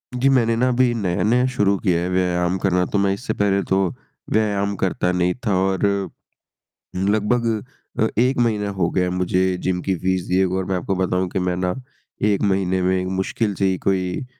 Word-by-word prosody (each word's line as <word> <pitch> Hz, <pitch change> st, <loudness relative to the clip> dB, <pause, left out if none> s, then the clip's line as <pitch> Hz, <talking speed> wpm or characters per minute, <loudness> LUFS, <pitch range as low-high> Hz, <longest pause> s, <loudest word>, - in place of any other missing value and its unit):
जी, 130 Hz, +2 st, +2 dB
मैंने 115 Hz, -4 st, +3 dB
ना 125 Hz, +2 st, +2 dB
अभी 125 Hz, -1 st, +2 dB
नया-नया 105 Hz, +5 st, +1 dB
शुरू 100 Hz, -3 st, +2 dB
किया 90 Hz, -4 st, 0 dB
है 90 Hz, -, -2 dB
व्यायाम 90 Hz, 0 st, 0 dB
करना, 90 Hz, -1 st, +1 dB
तो -, -, -2 dB
मैं 100 Hz, -1 st, +2 dB
इससे 120 Hz, +7 st, -4 dB
पहले 100 Hz, -1 st, +1 dB
तो 95 Hz, -, +3 dB, 0.5 s
व्यायाम 100 Hz, -2 st, +1 dB
करता 90 Hz, -1 st, 0 dB
नहीं 90 Hz, 0 st, +1 dB
था, 100 Hz, -, +2 dB
और 95 Hz, 0 st, +1 dB, 1.2 s
लगभग 105 Hz, +5 st, +1 dB, 0.5 s
अ, 110 Hz, -, +4 dB
1 125 Hz, +2 st, +2 dB
महीना 110 Hz, -4 st, +1 dB
हो 95 Hz, -3 st, 0 dB
गया 90 Hz, -, +1 dB
है 90 Hz, -, -1 dB
मुझे 90 Hz, 0 st, 0 dB
जिम 90 Hz, -1 st, 0 dB
की 95 Hz, -, 0 dB
फ़ीस 95 Hz, +1 st, 0 dB
दिए 95 Hz, +1 st, +2 dB
हुए, 95 Hz, 0 st, -1 dB
और 95 Hz, -, -1 dB
मैं 95 Hz, 0 st, -1 dB
आपको 95 Hz, +2 st, -2 dB
बताऊँ 90 Hz, 0 st, 0 dB
कि 95 Hz, -, -2 dB
मैं 90 Hz, -1 st, -1 dB
ना, 90 Hz, 0 st, -1 dB, 0.5 s
1 105 Hz, -1 st, +2 dB
महीने 95 Hz, -2 st, +1 dB
में 90 Hz, 0 st, +1 dB, 0.2 s
मुश्किल 105 Hz, +1 st, -1 dB
से 95 Hz, -, -1 dB
ही 95 Hz, -1 st, 0 dB
कोई 95 Hz, -2 st, +1 dB
अ, 130 Hz, -, -8 dB
95 Hz, 200 wpm, -21 LUFS, 90-105 Hz, 1.2 s, अ